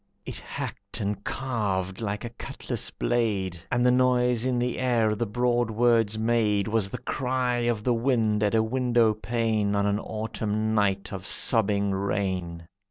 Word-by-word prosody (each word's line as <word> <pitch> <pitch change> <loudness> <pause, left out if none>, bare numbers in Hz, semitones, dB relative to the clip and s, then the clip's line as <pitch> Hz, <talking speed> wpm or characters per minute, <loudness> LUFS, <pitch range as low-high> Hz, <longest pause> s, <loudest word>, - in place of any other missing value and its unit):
It - - -4
hacked - - -6
and 100 0 -3
carved 100 -7 -2
like 105 +1 -3
a 120 - -6
cutlass 120 - -4
blade, 100 -7 -1
And 125 0 +2
the 125 - +6
noise 125 -1 +3
in 130 -1 +1
the 120 0 -1
air 120 -4 +2
the 115 +2 -2
broad 120 +2 +1
words 115 -1 +2
made 110 -3 +1
Was 110 -3 +1
the - - -5
cry 125 -1 -1
of 110 -3 -1
the 125 - +2
wind 115 -3 +1
at 105 +1 +2
a 110 - +4
window 120 -1 +2
pane 110 -2 0
On 100 0 +1
an 100 0 +1
Autumn 110 0 -2
night 100 -2 0
of 95 -1 -6
sobbing 100 -3 +2
rain. 95 -4 -2
110 Hz, 165 wpm, -26 LUFS, 100-120 Hz, -, the